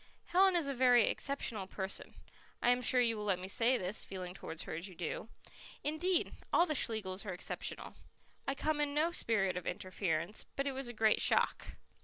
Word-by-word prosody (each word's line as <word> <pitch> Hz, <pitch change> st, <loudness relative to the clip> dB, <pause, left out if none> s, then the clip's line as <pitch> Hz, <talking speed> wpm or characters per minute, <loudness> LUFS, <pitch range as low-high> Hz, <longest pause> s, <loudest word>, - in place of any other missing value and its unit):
Helen 375 Hz, +1 st, +4 dB
is 335 Hz, -5 st, +1 dB
a 275 Hz, -, -1 dB
very 250 Hz, -2 st, +5 dB
exceptional 225 Hz, -9 st, -2 dB
person 190 Hz, 0 st, -4 dB, 0.4 s
I 240 Hz, -, +2 dB
am 245 Hz, 0 st, +2 dB
sure 250 Hz, 0 st, +3 dB
you 230 Hz, -2 st, +2 dB
will 210 Hz, -, -5 dB
let 200 Hz, -3 st, +1 dB
me 185 Hz, +1 st, -6 dB
say 240 Hz, +5 st, +2 dB
this, 185 Hz, +2 st, -2 dB
feeling 185 Hz, -2 st, -6 dB
towards 165 Hz, -4 st, -6 dB
her -, -, -6 dB
as 165 Hz, +5 st, -4 dB
you 185 Hz, -, -12 dB
do 175 Hz, +6 st, -4 dB, 0.5 s
indeed, 335 Hz, +4 st, +1 dB, 0.2 s
all 345 Hz, -, +5 dB
the 310 Hz, -, -1 dB
Schlegels 215 Hz, -8 st, -2 dB
are 200 Hz, -4 st, -4 dB
exceptional. 175 Hz, -, -4 dB, 0.5 s
I 275 Hz, -, 0 dB
come 305 Hz, +1 st, 0 dB
in 290 Hz, -1 st, -1 dB
no 320 Hz, +3 st, +2 dB
spirit 205 Hz, -, +1 dB
of 180 Hz, -, -5 dB
interference, 185 Hz, 0 st, -2 dB
but 275 Hz, -, -1 dB
it 280 Hz, -, 0 dB
was 265 Hz, -1 st, -4 dB
a 240 Hz, -, -5 dB
great 220 Hz, -1 st, +3 dB
shock." -, -, +3 dB
230 Hz, 200 wpm, -34 LUFS, 190-280 Hz, 0.5 s, very